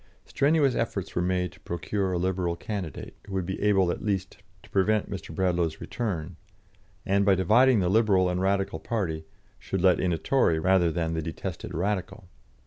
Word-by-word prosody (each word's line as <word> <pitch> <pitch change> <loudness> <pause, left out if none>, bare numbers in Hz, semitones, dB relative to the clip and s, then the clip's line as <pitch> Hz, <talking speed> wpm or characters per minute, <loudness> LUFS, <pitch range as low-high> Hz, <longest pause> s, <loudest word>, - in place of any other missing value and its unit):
Strenuous 145 -2 +2
efforts 100 -5 -2
were 85 - +1
made 90 -1 0
to - - -18
procure 95 +3 -2
a 90 - 0
Liberal 90 -1 -1
candidate, 90 -4 -6
who 100 - -8
would 95 -2 -1
be 95 +1 -4
able 95 -4 +3
at - - -5
least 95 -3 -2 0.3
to - - -17
prevent 105 +2 +1
Mr. 95 -4 -6
Bradlaugh's 85 -3 0
return, 90 -7 -4 0.7
and, 100 +1 +2
by 100 -1 +4
dividing 110 +5 +4
the 90 - +1
Liberal 100 -2 +3
and 90 0 -1
Radical 95 0 0
party, 80 -9 -3 0.3
should 95 - -3
let 90 -3 +5
in 90 - +1
a 85 - 0
Tory 105 - +2
rather 90 0 +3
than 80 0 -1
the 80 - -1
detested 80 -2 -6
Radical. 95 +1 -2
95 Hz, 180 wpm, -27 LUFS, 85-100 Hz, 0.7 s, let